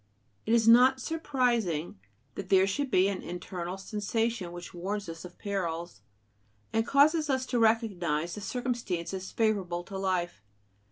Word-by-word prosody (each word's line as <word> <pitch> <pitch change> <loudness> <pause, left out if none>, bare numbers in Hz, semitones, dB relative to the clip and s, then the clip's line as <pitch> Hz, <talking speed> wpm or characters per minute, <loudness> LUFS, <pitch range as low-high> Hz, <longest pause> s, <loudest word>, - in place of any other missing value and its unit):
It 225 - +4
is 225 -1 +3
not 255 +3 +7
surprising 240 - -1 0.3
that 195 -1 -7
there 190 -1 +5
should 270 +8 -1
be 185 -5 +4
an 195 -2 -2
internal 180 +1 -5
sensation 210 -1 -2
which 175 0 -9
warns 195 +3 -4
us 165 -1 -7
of 180 - -12
perils, 175 -4 -4 0.7
and 225 +1 +1
causes 300 +2 +4
us 260 -1 +1
to 250 -2 -1
recognize 185 -8 +1
the 210 - -6
circumstances 195 -7 -3
favorable 195 -6 0
to 195 +1 -7
life. 180 - -1
200 Hz, 145 wpm, -29 LUFS, 175-235 Hz, 0.7 s, not